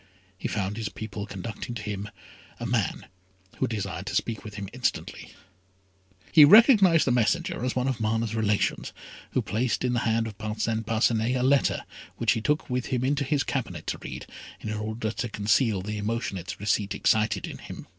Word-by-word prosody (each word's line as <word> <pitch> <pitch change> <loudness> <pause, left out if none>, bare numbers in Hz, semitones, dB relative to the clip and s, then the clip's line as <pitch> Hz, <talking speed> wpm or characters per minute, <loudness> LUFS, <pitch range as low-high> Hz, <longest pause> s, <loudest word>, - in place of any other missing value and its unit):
He 95 - -4
found 100 0 -2
his 110 -2 -3
people 105 -1 -6
conducting 100 +4 -6
to 110 - -5
him, 105 0 -4 0.5
a - - -4
man - - -1 0.5
who - - +1
desired 100 -3 -4
to 105 - -3
speak 110 0 -1
with 105 -2 -9
him 100 -1 -5
instantly. 125 0 -3 1.0
He 155 - +9
recognised 200 - +7
the 130 - +2
messenger 125 +5 +1
as 125 - -1
one 130 0 0
of 130 -3 -1
Mana's 110 0 0
relations, 105 -2 0 0.4
who - - +1
placed 115 +6 -1
in 125 -1 +1
the 120 - +2
hand 115 0 +1
of 110 -2 -8
Parcin 110 +1 -2
Parcinet 115 +2 +1
a 125 - 0
letter 135 +1 +3 0.3
which 115 -2 +2
he 115 -1 0
took 150 +6 0
with 125 -1 -2
him 125 -2 -1
into 140 +1 +1
his 140 0 +1
cabinet 130 -3 -3
to - - -3
read, - - -7 0.3
in 110 - -4
order 110 +1 -3
to 115 +2 -3
conceal 105 -1 +1
the 105 +1 -4
emotion 110 0 -2
its 90 0 -6
receipt 105 0 0
excited 105 -2 +2
in - - -8
him. - - -9
110 Hz, 185 wpm, -27 LUFS, 105-125 Hz, 1.0 s, He